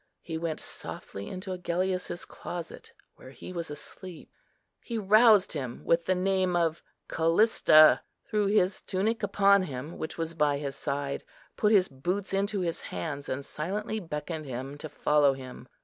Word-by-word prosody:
He 165 - -5
went 165 -2 -3
softly 100 +1 -5
into 185 +1 -6
Agellius's 180 0 -2
closet, 170 -2 -8 0.3
where - - -12
he 140 +6 -10
was 170 -3 -4
asleep, 170 +3 -9 0.5
he 235 - -4
roused 215 0 +5
him 130 -6 -5
with 170 0 +2
the 185 - +2
name 185 -1 +1
of 165 -2 +1 0.3
Callista, 165 -2 +5 0.3
threw 210 -1 +1
his 195 -2 +2
tunic 215 +4 -1
upon 200 -1 +4
him, 145 -2 -6
which 160 - -5
was 165 0 -2
by 150 -3 +2
his 140 -2 -4
side, 140 0 -3 0.3
put 210 - +2
his 195 -4 +5
boots 180 +10 -3
into 200 +1 0
his 170 -2 -2
hands, 145 -3 -5
and 135 +1 -3
silently 210 +7 -3
beckoned 155 -3 -5
him 130 +2 -5
to 155 - -6
follow 145 -1 +3
him. 130 -1 -10
170 Hz, 155 wpm, -28 LUFS, 150-195 Hz, 0.5 s, roused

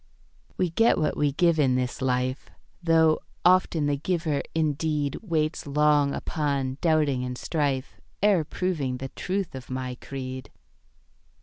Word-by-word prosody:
We 180 -3 0
get 225 +7 +4
what 155 - 0
we 145 -1 +1
give 170 +2 +2
in 130 -3 +3
this 125 0 -2
life, 130 0 -1 0.3
Though 160 -2 +4 0.3
often 180 -4 +4
the 145 -1 +1
giver 160 -2 -1
indeed 150 -2 0
Waits 160 -7 -1
long 150 0 +3
upon 140 -4 -2
doubting 150 -6 +2
and 125 0 -4
strife 140 -5 -2 0.2
Ere 200 -6 +4
proving 150 -6 -2
the 135 +1 -6
truth 190 +4 -3
of 130 -2 -9
my 130 -1 -3
creed. 130 -1 -6
150 Hz, 135 wpm, -26 LUFS, 130-165 Hz, 0.3 s, get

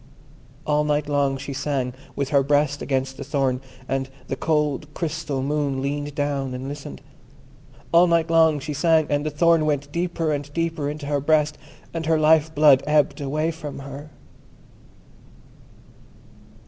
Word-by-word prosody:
All 150 0 +2
night 150 0 0
long 140 -2 +1
she 140 +1 -6
sang 135 -2 -2 0.2
with 140 -1 -2
her 140 -2 +4
breast 145 +1 +1
against 135 -1 -2
the - - -6
thorn, 135 -2 0 0.3
and 135 0 -2 0.2
the - - -1
cold 150 -1 -1
crystal 155 -5 -3
Moon 140 -1 -1
leaned 145 +1 -3
down 140 -3 -2
and 130 +1 -5
listened. 140 - -7 0.9
All 170 +1 +6
night 170 -1 +2
long 160 -2 +4
she 150 +2 -5
sang, 160 +2 +3
and 145 0 +1
the 155 - -1
thorn 165 +2 +3
went 145 -1 -1
deeper 170 -1 -1
and 145 0 -4
deeper 165 -3 -1
into 150 0 -6
her 145 0 0
breast, 150 0 +2 0.3
and 165 -1 -3
her 160 -1 +3
life 155 0 +3
blood 145 -3 +6
ebbed 150 0 +2
away 155 +4 -1
from 155 -3 -7
her. 140 +2 -9
145 Hz, 155 wpm, -23 LUFS, 140-155 Hz, 0.9 s, All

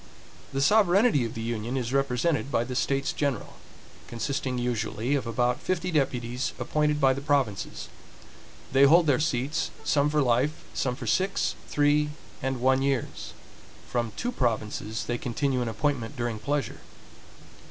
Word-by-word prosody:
The 135 0 0
sovereignty 200 - +4
of 115 - -6
the 115 - -4
Union 115 +2 -2
is 125 0 -2
represented 140 +2 +1
by 115 - +2
the 125 +1 -5
States 135 +2 0
General, 140 -7 -2 0.5
consisting 130 +1 -2
usually 120 +1 -1
of 135 -4 0
about 120 +2 0
fifty 185 0 -1
deputies 125 -4 -1
appointed 150 -1 0
by 135 -2 +4
the 135 - -5
provinces. 140 -8 -1 0.8
They 135 +1 +6
hold 165 +4 +6
their 140 -5 +3
seats, 150 +1 0
some 145 0 +2
for 150 -1 +2
life, 130 +5 +1
some 125 -2 -1
for 140 - -7
six, 190 +1 +1
three, 150 0 +2 0.3
and 130 -1 -2
one 130 +1 +3
years; 135 -3 -2 0.5
from 120 -2 -1
two 245 - -1
provinces 110 - -2
they 120 0 -2
continue 130 +1 -1
in 120 - -1
appointment 130 +2 -2
during 120 -2 -2
pleasure. 140 -1 -2
135 Hz, 150 wpm, -27 LUFS, 120-145 Hz, 0.8 s, They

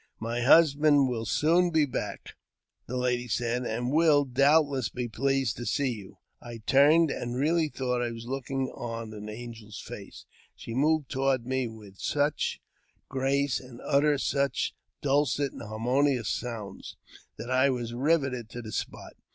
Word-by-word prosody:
" - - -45
My 120 +1 -1
husband 145 0 +5
will 115 -3 -3
soon 170 - +3
be 160 -3 +3
back," 105 -6 -5 0.5
the 125 - -3
lady 125 -1 0
said, 120 +2 -1
" - - -1
and 120 +3 -2
be, 155 -2 +5
doubtless, 140 -1 +3
pleased 130 +1 -1
to 120 - -5
see 140 -3 +1
you." 105 -5 -9 0.2
I 115 -2 -9
turned, 150 +3 +5
and 120 0 -4
really 155 +4 +2
thought 125 -3 -2
I 120 - -1
was 115 0 -8
looking 135 +1 -3
on 115 -2 -6
an 105 0 -8
angi 110 -1 -8
face. - - -10 0.3
She 115 - -8
moved 150 +3 +1
toward 135 -2 +1
me 130 0 -1
with 105 -4 -12
such 145 +1 0 0.5
grace, 140 +1 0
and 125 -2 -12
uttered 145 0 +3
sue 140 0 +1 0.6
dulcet 140 -1 +1
and - - -9
harmonious 120 +2 0
sounds, 110 -5 -5 0.4
that 120 +3 -6
I 130 +2 +4
was 120 -3 -3
riveted 135 -4 0
to 120 +1 -7
the 110 - -7
i - - -8
spot. - - -5
130 Hz, 160 wpm, -28 LUFS, 120-140 Hz, 0.6 s, husband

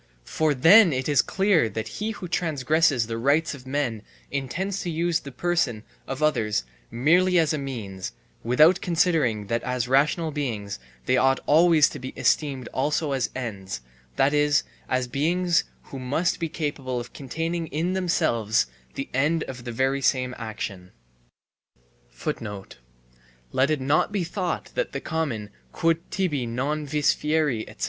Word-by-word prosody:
For 155 -2 +1
then 175 - +7
it 130 0 -2
is 145 -4 +4
clear 190 - +2
that 110 +2 -4
he 215 - 0
who 205 -4 -6
transgresses 155 -5 +1
the 115 0 -4
rights 145 +7 +2
of 130 -2 -11
men 130 -6 -1 0.3
intends 180 +9 -2
to 175 - -3
use 170 0 0
the 140 - -9
person 135 -7 0 0.2
of 135 +3 -3
others 105 - +1 0.3
merely 180 +9 +3
as 160 -2 +3
a 155 - -1
means, 105 -9 -5 0.3
without 155 +10 +5
considering 160 - +1
that 115 +3 -1
as 125 -1 -2
rational 150 +5 +2
beings 110 - -3 0.3
they 130 - +3
ought 135 +1 +3
always 160 0 +5
to - - -8
be 130 +1 -7
esteemed 135 -5 +1
also 150 +2 0
as 135 -2 0
ends, 100 - -5 0.3
that 140 +2 +3
is, 145 -1 +3 0.3
as 130 -1 0
beings 170 +6 +1 0.2
who 135 - -9
must 140 +7 0
be 165 -1 -2
capable 145 -5 -3
of 120 - -8
containing 165 +4 -3
in 165 +5 -1
themselves 115 - +1 0.3
the 135 - -4
end 150 +5 +2
of 125 -2 -8
the 120 - -4
very 135 +3 0
same 130 -1 +1
action. 100 -5 -6 2.6
Let 130 +2 +2
it 155 -2 +1
not 145 +8 +2
be 200 -3 0
thought 180 +1 -3
that - - -2
the - - -2
common 140 -11 -3 0.2
"quod 165 - +1
tibi 150 -10 -1
non 145 +6 -2
vis 150 0 +2
fieri, 150 -7 0
etc." - - -15
145 Hz, 155 wpm, -25 LUFS, 125-165 Hz, 2.6 s, then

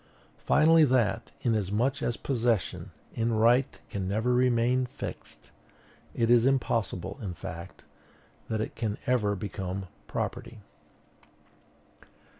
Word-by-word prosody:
Finally, 160 +1 +6
that, 120 -5 +1
inasmuch 115 +4 0
as 120 - -1
possession, 120 -6 -1 0.2
in 115 0 0
right, 120 +4 +3
can 95 -2 -3
never 110 +5 +1
remain 125 0 +2
fixed, - - -8 0.6
it 115 0 +2
is 120 +1 +5
impossible, 115 -6 -1
in 95 -5 -5
fact, 85 +3 -8 0.7
that 110 -1 -1
it - - -4
can 110 -3 -2
ever 110 -5 +1
become 95 -1 -4 0.2
property. - - -4
115 Hz, 105 wpm, -28 LUFS, 105-125 Hz, 0.7 s, Finally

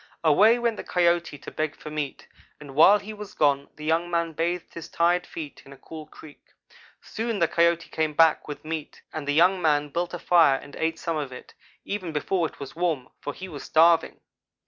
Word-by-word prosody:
"Away 205 +9 +5
went 235 -2 -1
the - - -6
Coyote 170 -3 +1
to - - -10
beg 155 -1 -3
for 150 - -10
meat, 150 -3 -5 0.3
and 145 -2 -11
while 165 +8 +7
he 210 +2 -8
was 210 -1 -10
gone 140 -2 +2
the 150 - -9
young 165 +2 +1
man 170 -1 -1
bathed 170 +2 -2
his 170 - -8
tired 175 +1 +1
feet 155 -3 -8
in 135 - -16
a - - -15
cool 155 +1 -10
creek. 155 -1 -15 0.6
Soon 225 0 -3
the 170 - +2
Coyote 170 0 +2
came 155 -1 -1
back 160 0 +4
with 150 +1 -8
meat, 155 -1 -6
and 150 -2 -5
young 180 +5 +4
man 150 -2 +2
built 175 +4 -3
a - - -4
fire 165 -6 +4
and 145 +1 -12
ate 165 0 -1
some 165 -2 -3
of 145 -3 -4
it, 125 - -11 0.3
even 190 -4 -4
before 165 +3 0
it - - -17
was 140 +1 -8
warm, 165 -7 -1
for - - -5
he 190 - -9
was 150 -6 -8
starving. 165 +1 +3
165 Hz, 210 wpm, -25 LUFS, 150-175 Hz, 0.6 s, while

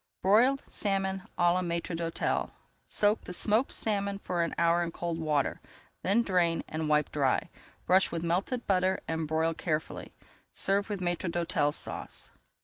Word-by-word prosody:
BROILED 240 +8 +4
SALMON 195 -2 -1
À 175 0 +4
LA 185 - +1
MAÎTRE 170 -1 -2
D'HÔTEL 165 0 -1 0.4
Soak 210 +1 +2
the 180 - -6
smoked 215 +7 +1
salmon 200 -2 -1
for 180 -3 -2
an 170 - -1
hour 170 +1 +3
in 170 - -1
cold 170 0 -4
water, 150 -3 0 0.4
then 210 +5 +2
drain 175 -5 +1
and 155 0 -3
wipe 150 0 +2
dry. 140 -3 0 0.3
Brush 190 +1 +4
with 165 -1 -3
melted 190 +9 -1
butter 190 -1 +2
and 160 -1 -2
broil 160 +1 +1
carefully. 155 -1 -3 0.4
Serve 200 +2 +1
with 205 -3 -3
Maître 175 0 -1
d'Hôtel 165 -4 +1
Sauce. - - -5
175 Hz, 155 wpm, -29 LUFS, 165-195 Hz, 0.4 s, BROILED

